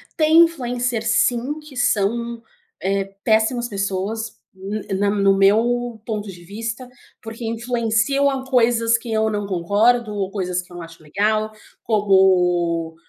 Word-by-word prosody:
Tem 315 +1 +3
influencer 245 -7 -3
sim, 245 +6 +1
que 300 -3 -14
são, 235 +1 0 0.4
eh, 195 +1 0 0.2
péssimas 225 +2 +2
pessoas, 200 +2 -3 0.5
na 200 +1 0
no 200 -1 0
no - - -1
meu 230 +4 +2
ponto 210 -2 -4
de 175 -2 -13
vista, 225 +6 -6 0.3
porque 225 +1 -9
influenciam 235 +3 0
a 265 -1 -3
coisas 230 -2 +2
que 230 0 -8
eu 220 0 +1
não 205 -1 -3
concordo 210 +5 +1
ou 195 -1 -3
coisas 180 -3 -2
que 180 - -20
eu - - -11
não 170 - -7
acho 165 -1 -14
legal, 215 +6 0 0.3
como, 180 -5 +2
220 Hz, 140 wpm, -21 LUFS, 195-240 Hz, 0.5 s, Tem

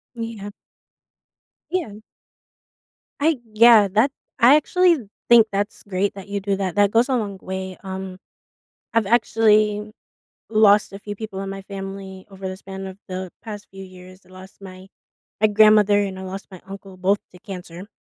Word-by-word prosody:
Yeah. 225 -3 -6 1.2
Yeah. 220 - -3 1.2
I 315 -1 +3 0.2
yeah. 225 -2 +7
That 220 +8 +2 0.3
I 255 +5 +8
actually 355 +2 +3 0.3
think 235 -2 +8
that's 205 +2 -3
great 195 +1 0
that 195 0 -10
you 200 0 -3
do 200 0 -1
that, 190 -3 -2
that 205 -1 +4
goes 235 +3 +3
a 260 - +1
long 205 -4 -3
way. 190 0 -6
Um, 190 -1 -6 0.8
I've 225 -3 +2
actually 215 -2 +2 0.6
lost 210 -2 +4
a 195 - -8
few 205 0 -7
people 205 -2 -7
in 195 - -5
my 195 0 -7
family 195 -1 -8
over 190 -1 -7
the 185 - -6
span 195 0 -8
of 190 +1 -9
the 185 -1 -5
past 210 -2 -8
few 195 0 -10
years. 185 0 -14
I - - -22
lost 190 +1 -14
my 190 0 -12 0.5
my 215 - +6
grandmother 210 -1 +5
and 190 -2 -3
I - - -7
lost 190 +1 -7
my 185 - -11
uncle 195 -1 -10
both 190 +2 +1 0.2
to 180 - -15
cancer. 185 -2 -9
200 Hz, 165 wpm, -22 LUFS, 190-215 Hz, 1.2 s, I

